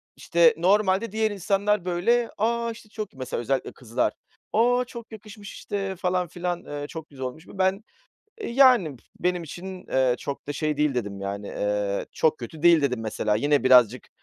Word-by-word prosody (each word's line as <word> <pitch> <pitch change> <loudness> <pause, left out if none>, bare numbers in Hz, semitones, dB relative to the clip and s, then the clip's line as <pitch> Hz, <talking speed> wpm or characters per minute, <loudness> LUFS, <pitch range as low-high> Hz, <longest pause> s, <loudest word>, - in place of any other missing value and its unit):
işte, 480 -2 +4
normalde 200 +2 +2
diğer 220 0 +1
insanlar, 200 0 0
böyle, 230 +7 +1
"A! 235 +2 0
işte 220 -1 -12
çok" 215 -2 -6
mesela 130 -2 -4
özellikle 135 +2 -1
kızlar, 115 -2 -1 0.4
"O! 245 +3 +3
çok 235 -2 -10
yakışmış" 210 -2 -10
işte, 195 -1 -4
falan, 180 0 0
filan, 175 +1 -4
eee, 145 0 -5
"Çok 160 -1 -8
güzel 130 -2 -6
olmuş 155 +7 -7
bu." 195 - -12
Ben, 190 +3 +1 0.6
eee, - - -4
yani, 235 - +5
"p 115 - -23 0.2
benim 180 -1 0
için, 180 +4 -8
ııı, 130 -2 +2
çok 140 - -6
da - - -1
şey 150 +1 -1
değil" 150 -2 +1
dedim 100 -5 -3
yani, 100 +1 -5
ııı, 105 -1 -1
"Çok 155 -1 +1
kötü 150 +6 -9
değil" 170 -2 +7
dedim 125 -4 0
mesela. 110 -1 -1
Yine 145 +3 +2
birazcık, 125 -2 +5
175 Hz, 180 wpm, -25 LUFS, 130-210 Hz, 0.6 s, değil